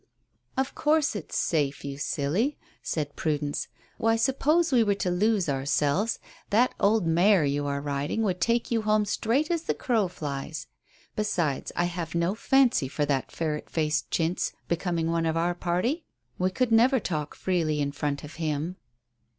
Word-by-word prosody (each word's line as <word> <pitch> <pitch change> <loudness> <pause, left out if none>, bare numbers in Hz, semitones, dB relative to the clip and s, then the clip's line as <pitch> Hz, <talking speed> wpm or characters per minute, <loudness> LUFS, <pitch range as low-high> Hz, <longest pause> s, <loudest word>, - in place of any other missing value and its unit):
"Of 265 0 0
course 305 -4 +2
it's 195 - -4
safe, 145 -4 0
you 140 0 -5
silly," 175 - 0 0.2
said 145 -3 -3
Prudence. 150 -2 -1 0.3
"Why, 225 0 +3
suppose 295 +8 +2
we 250 -3 +5
were 205 -2 +2
to 185 -2 -1
lose 200 +1 +2
ourselves, 145 +9 +1 0.3
that 235 +5 +3
old 210 -2 +3
mare 175 +1 +4
you 145 +1 0
are 140 0 -1
riding 145 +8 -2
would 180 -4 -1
take 235 +6 +1
you 230 -1 +2
home 215 0 +2
straight 245 - 0
as 335 -2 +1
the - - -1
crow 225 -6 +1
flies. 145 -3 -5 0.5
Besides, 170 -10 -1
I 175 - +1
have 170 -2 -4
no 170 +3 +1
fancy 245 - +3
for 145 +3 -1
that 135 -3 -1
ferret 155 -2 -3
faced 155 -2 0
Chintz 165 +2 0
becoming 170 -1 0
one 165 -1 +1
of 160 0 0
our 170 +1 +1
party. 185 - -1 0.3
We 185 +1 +2
could 245 +5 0
never 245 +4 +5
talk 155 -7 -3
freely 165 -5 0
in 140 -1 0
front 140 0 -3
of 150 +1 -10
him." 155 +3 -2
175 Hz, 165 wpm, -27 LUFS, 150-225 Hz, 0.5 s, we